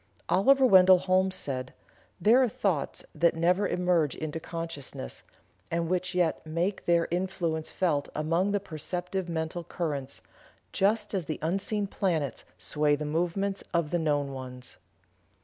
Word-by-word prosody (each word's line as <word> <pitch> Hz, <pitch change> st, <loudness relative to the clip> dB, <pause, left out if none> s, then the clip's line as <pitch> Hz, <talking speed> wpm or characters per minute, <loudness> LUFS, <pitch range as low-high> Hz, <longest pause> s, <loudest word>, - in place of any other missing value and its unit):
Oliver 260 Hz, +10 st, +5 dB
Wendell 185 Hz, -5 st, +8 dB
Holmes 185 Hz, +1 st, +1 dB
said: 130 Hz, -6 st, -3 dB, 0.4 s
"There 225 Hz, +8 st, +5 dB
are 255 Hz, -, +3 dB
thoughts 180 Hz, -9 st, -2 dB
that 170 Hz, -1 st, +2 dB
never 180 Hz, +4 st, +2 dB
emerge 175 Hz, -6 st, +1 dB
into 155 Hz, 0 st, -4 dB
consciousness, 165 Hz, -, -6 dB, 0.5 s
and 170 Hz, 0 st, -1 dB
which 185 Hz, 0 st, -1 dB
yet 175 Hz, -3 st, +1 dB
make 170 Hz, +5 st, -2 dB
their 170 Hz, -1 st, +3 dB
influence 175 Hz, -3 st, -1 dB
felt 155 Hz, -6 st, 0 dB
among 165 Hz, +5 st, +1 dB
the 205 Hz, -, +1 dB
perceptive 180 Hz, +2 st, -4 dB
mental 160 Hz, +1 st, -3 dB
currents, 145 Hz, -6 st, -4 dB, 0.5 s
just 210 Hz, +2 st, +1 dB
as 185 Hz, -4 st, -1 dB
the 155 Hz, -, -2 dB
unseen 195 Hz, +5 st, -1 dB
planets 165 Hz, -, -2 dB
sway 145 Hz, -, +1 dB
the 150 Hz, +1 st, -4 dB
movements 175 Hz, +6 st, -1 dB
of 170 Hz, -3 st, +1 dB
the 175 Hz, -, +1 dB
known 145 Hz, -3 st, 0 dB
ones." 130 Hz, -1 st, -8 dB
170 Hz, 140 wpm, -28 LUFS, 155-190 Hz, 0.5 s, Wendell